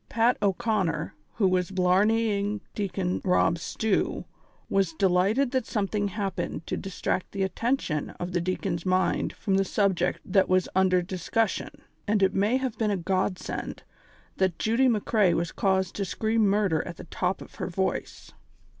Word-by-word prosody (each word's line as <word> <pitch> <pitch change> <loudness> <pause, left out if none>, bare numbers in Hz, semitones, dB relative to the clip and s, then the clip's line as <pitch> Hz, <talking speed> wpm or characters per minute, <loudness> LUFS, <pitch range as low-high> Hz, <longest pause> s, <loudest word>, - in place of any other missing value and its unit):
Pat 230 +2 +3
O 200 -2 +4
'Conner, 190 -8 -1 0.2
who 205 -4 +3
was 185 -1 +1
blarneying 205 +2 +2
Deacon 190 -3 -2
Rob 180 -3 +2
Stew, 220 +4 -1 0.4
was 195 -4 +1
delighted 195 +9 +2
that 260 -3 -1
something 205 -1 -1
happened 195 -5 -3
to - - -2
distract 185 -1 -3
the 195 -1 -1
attention 190 - -1
of 175 +1 -4
the 175 -1 0
dea 185 +2 0
con's 170 -4 -3
mind 185 0 +1
from 195 -3 0
the 195 - +3
subject 190 -2 +1
that 190 0 +2
was 185 0 +4
then - - -11
under 185 -1 +4
discus 190 +4 0
sion, - - -5 0.4
and 205 -1 +2
it 190 - +3
may 210 +6 +2
have 260 -3 -3
been 220 -2 +1
a 200 - +1
God 185 +1 0
send - - -6 0.5
that 185 -3 +1
Judy 230 +4 +2
McCrea 210 -5 +2
was 170 0 -1
caused 190 -2 +1
to 200 - 0
scream 220 +3 +1
murder 195 -5 +2
at 170 - -7
the - - -9
top 180 +2 -2
of - - -12
her 185 - -1
voice. 190 +1 -3
195 Hz, 170 wpm, -27 LUFS, 180-210 Hz, 0.5 s, O